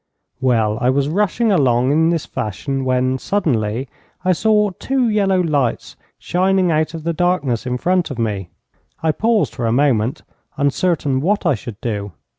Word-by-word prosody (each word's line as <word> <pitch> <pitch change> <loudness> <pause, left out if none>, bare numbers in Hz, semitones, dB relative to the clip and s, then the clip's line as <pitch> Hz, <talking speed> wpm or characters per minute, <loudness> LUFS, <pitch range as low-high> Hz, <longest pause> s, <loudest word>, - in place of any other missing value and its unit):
Well, 115 -4 +1
I 125 - +3
was 140 +2 +1
rushing 210 +5 +1
along 130 -7 +3
in 160 +2 +3
this 170 -3 -1
fashion 135 +6 -3
when, 130 0 +1
suddenly, 130 - -1 0.4
I 185 - +4
saw 210 +3 +2
two 260 +7 -1
yellow 200 -3 +2
lights 145 -8 -1 0.2
shining 185 0 +1
out 155 +1 0
of 160 - -7
the 170 +1 -1
darkness 150 -9 0
in 125 0 -1
front 180 +5 +1
of 135 - -6
me. 105 -6 -2 0.5
I 160 - +3
paused 220 +4 +1
for 115 - -2
a - - +1
moment, 125 -2 +1 0.3
uncertain 140 -1 0
what 200 +5 0
I 170 - +4
should 110 -2 -7
do. 105 -4 -3
145 Hz, 165 wpm, -19 LUFS, 125-185 Hz, 0.5 s, I